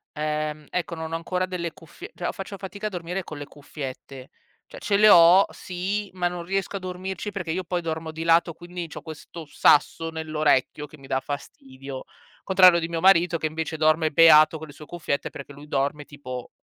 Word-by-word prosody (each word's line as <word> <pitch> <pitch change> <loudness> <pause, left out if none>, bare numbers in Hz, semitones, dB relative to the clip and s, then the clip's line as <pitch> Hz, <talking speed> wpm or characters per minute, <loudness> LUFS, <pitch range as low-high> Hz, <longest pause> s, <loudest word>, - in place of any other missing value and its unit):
uhm, 150 0 -3
ecco 175 -1 -3
non 160 0 -6
ho - - -2
ancora 180 +2 -2
delle 175 -3 -4
cuffie 350 - -12
cioè, - - -3
o - - -1
faccio 195 -1 -8
fatica 200 +2 -6
a - - -3
dormire 180 +1 -4
con 155 - -9
le 145 - -6
cuffiette. 135 -2 -9 0.4
Cioè, - - -12
ce 200 -1 +1
le 215 +1 +7
ho, 175 +1 +8
sì, 195 +3 -4
ma 180 -1 0
non 175 -1 -5
riesco 195 +2 -2
a - - -6
dormirci 185 +2 -5
perché 185 -5 -4
io 185 +3 -2
poi 175 0 -2
dormo 160 -1 -4
di 160 +1 -6
lato 165 0 +3
quindi 175 0 -7
c'ho 155 - -9
questo 160 +1 -10
sasso 150 +2 +3
nell'orecchio 155 -3 0
che 150 +1 -15
mi 135 - -15
dà 130 0 -1
fastidio. 135 -1 -8 0.4
Contrario 185 -2 +6
di 165 - -3
mio 165 -1 -3
marito 175 -2 +4
che 160 - -4
invece 160 0 -3
dorme 155 +1 +3
beato 155 0 +6
con 160 - -8
le 145 - -13
sue 150 +1 -13
cuffiette 155 -5 -3
perché 140 0 -10
lui 145 +2 -13
dorme 145 +1 -1
tipo 130 -4 -8
165 Hz, 205 wpm, -24 LUFS, 150-180 Hz, 0.4 s, ho